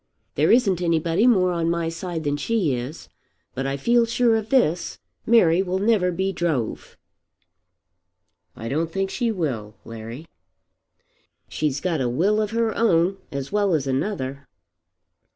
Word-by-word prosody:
There - - +2
isn't 200 -7 +3
anybody 170 +5 +2
more 185 -7 +4
on 170 -1 0
my 170 -1 -1
side 165 0 -4
than 145 -1 0
she 170 - 0
is. 125 +6 -6 0.5
But 135 +1 -3
I 135 0 -2
feel 235 - +3
sure 235 0 +2
of 220 -1 -2
this; 180 - +1 0.3
Mary 185 -7 +5
will 185 -1 -1
never 200 -3 +2
be 190 +3 -1
drove." 160 - -3 1.6
"I 115 - -7
don't 160 +6 -1
think 195 +2 -2
she 240 -3 0
will, 125 - -3
Larry." 115 +6 -8 1.2
"She's 145 -2 -2
got 165 -3 -1
a 125 - 0
will 195 - +1
of 210 - -1
her 225 0 0
own 185 -3 +2
as 140 -1 -5
well 200 -4 +2
as 145 -3 -1
another." 140 -1 -3
170 Hz, 150 wpm, -23 LUFS, 140-205 Hz, 1.6 s, Mary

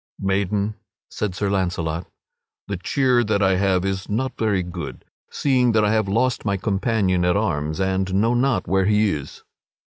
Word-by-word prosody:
"Maiden," 100 +2 -1 0.3
said 100 -4 -3
Sir 100 - -1
Launcelot, 85 -3 -1 0.6
"the 100 - -2
cheer 125 +6 +2
that 105 -2 +1
I 95 -1 +3
have 95 -1 +1
is 95 0 -3
not 130 +5 -1
very 105 -5 0
good, 90 0 -7 0.2
seeing 125 -4 +2
that 110 -1 +3
I 105 - +2
have 110 -2 +1
lost 120 +5 +1
my 100 -2 0
companion 95 -2 0
at 90 +2 +2
arms 80 -6 -1
and 95 0 0
know 115 +4 +2
not 130 0 +1
where 95 +2 +2
he 105 -1 +3
is." 75 -5 -6
100 Hz, 170 wpm, -22 LUFS, 95-110 Hz, 0.6 s, I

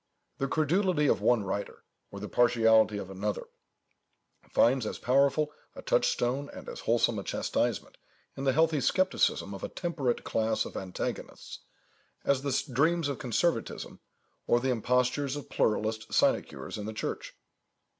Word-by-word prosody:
The 135 - 0
credulity 160 +2 +1
of - - +2
one 120 -4 +3
writer, 100 +1 -4 0.3
or 100 - -8
the 105 - -5
partiality 115 -3 +4
of 95 -1 -6
another, 100 +1 -3 1.1
finds 120 -1 +3
as - - -4
powerful 140 +4 +2 0.2
a - - -9
touchstone 135 +4 +1
and - - -10
as - - -7
wholesome - - +1
a - - -6
chastisement - - -2 0.4
in 135 - -5
the 135 - +3
healthy 160 0 +2
scepticism 185 - +1
of 95 - -8
a - - -3
temperate 150 -9 -2
class 110 0 0
of - - -9
antagonists, 95 -1 -5 0.7
as 140 -2 +2
the 140 -1 -2
dreams 160 +3 +2
of 140 - -4
conservatism, 125 +2 -1 0.5
or 120 - +4
the 130 +1 0
impostures 125 +4 +1
of 145 -4 -8
pluralist 110 +1 0
sinecures - - 0
in 105 - -5
the 110 - -4
Church. 110 - -5
125 Hz, 145 wpm, -29 LUFS, 110-145 Hz, 1.1 s, partiality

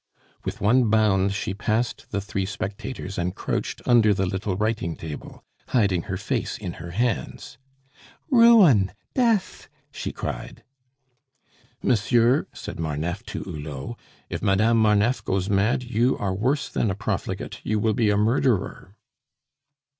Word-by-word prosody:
With - - -5
one 120 +3 +4
bound 100 -3 +3
she 100 +1 -3
passed 110 +4 -2
the 100 - -1
three 100 -1 -3
spectators 100 0 -5
and 90 +2 -2
crouched - - -3
under 115 -4 +5
the 95 0 0
little 95 0 -2
writing 105 -6 -1
table, 80 -3 -8 0.2
hiding 100 -8 +2
her 95 - -1
face 115 +5 -2
in 95 -5 -5
her 85 - -7
hands. 115 +4 -2 0.7
"Ruin! 210 - +6 0.2
Death!" 230 -6 0 0.2
she - - -5
cried. - - -6 1.2
"Monsieur," 120 +3 +3
said - - -8
Marneffe 80 +4 -2
to - - -5
Hulot, 75 - -6 0.3
"if - - -5
Madame 110 +4 +3
Marneffe 110 +3 +3
goes 95 +1 -1
mad, 105 +6 +2
you 120 +1 +1
are 95 -2 -1
worse 130 +9 0
than 110 - -1
a 95 - -1
profligate; - - -4
you 110 - 0
will 110 +1 +1
be 110 0 +2
a 105 - +2
murderer." 105 -3 0
105 Hz, 140 wpm, -24 LUFS, 95-120 Hz, 1.2 s, Ruin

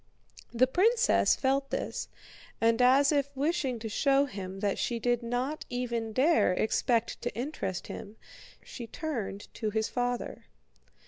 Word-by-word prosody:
The 245 +2 +4
princess 450 - +3
felt 275 +1 0
this, - - -3 0.5
and 230 +1 +3
as 270 +3 +5
if 280 -2 +1
wishing 275 -3 0
to 225 0 -6
show 275 +5 +3
him 195 -6 -7
that 200 -2 0
she 240 - -1
did 240 +1 +1
not 245 +6 -2
even 235 -2 -2
dare 265 - +3
expect 230 +3 0
to 245 - -3
interest 230 - -3
him, 205 +2 -8 0.5
she 235 - -8
turned 225 -10 -4
to 220 - -2
his 220 +1 -1
father. 245 -1 -3
245 Hz, 140 wpm, -29 LUFS, 225-275 Hz, 0.5 s, as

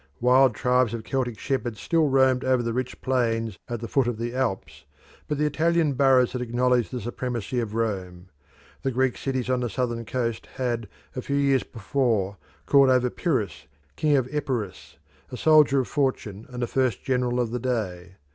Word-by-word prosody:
Wild 125 -1 +4
tribes 125 -2 +2
of 115 - -6
Celtic 125 -4 -2
shepherds 125 -4 -2
still 160 -3 +2
roamed 130 -1 +3
over 130 -2 +2
the 115 -1 -2
rich 130 +1 -3
plains 115 -5 0
at 120 -2 -4
the 115 - -4
foot 130 +1 +1
of 120 -2 -2
the 120 +1 -3
Alps, 125 -7 -3 0.4
but 150 - -2
the 150 - +1
Italian 160 0 +2
boroughs 130 -2 +4
had 125 0 -4
acknowledged 125 0 +1
the 125 - -4
supremacy 120 +1 -3
of 110 -2 -3
Rome. 95 -5 -3 0.5
The 135 - 0
Greek 130 0 +1
cities 130 -2 -2
on 130 -1 +1
the 120 -1 -2
southern 120 -1 -2
coast 115 0 -3
had, 120 -4 -2 0.3
a 130 - -3
few 140 - -3
years 140 -2 +3
before, 110 -3 -1 0.3
called 140 -2 +5
over 125 -1 +3
Pyrrhus, 120 - -2 0.3
King 150 -2 +2
of 130 -2 0
Epirus, 125 -10 -4 0.3
a 125 - -5
soldier 150 -2 +5
of 125 - -5
fortune 115 -7 -2
and 125 -1 -4
the - - -1
first 130 -2 0
general 125 -2 0
of 120 -2 0
the 125 - -2
day. 95 -7 -3
125 Hz, 185 wpm, -25 LUFS, 115-130 Hz, 0.5 s, called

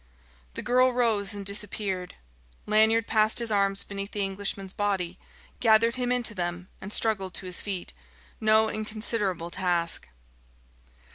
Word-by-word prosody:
The - - -4
girl 255 +1 +4
rose 220 -5 +1
and 200 -1 -6
disappeared. 200 -2 -2 0.5
Lanyard 220 +1 +4
passed 215 -1 +2
his 235 -2 -1
arms 200 -1 +2
beneath 200 0 -5
the 205 - 0
Englishman's 195 0 -4
body, 190 -4 -1 0.4
gathered 230 +1 +4
him 250 -1 -1
into 245 -3 +1
them, 175 -1 -4
and 195 - -7
struggled 195 -5 0
to - - -4
his 180 -1 -2
feet: 195 -4 -3 0.5
no 220 0 +4
inconsiderable 215 -5 -1
task. 175 - 0
205 Hz, 135 wpm, -27 LUFS, 190-220 Hz, 0.5 s, girl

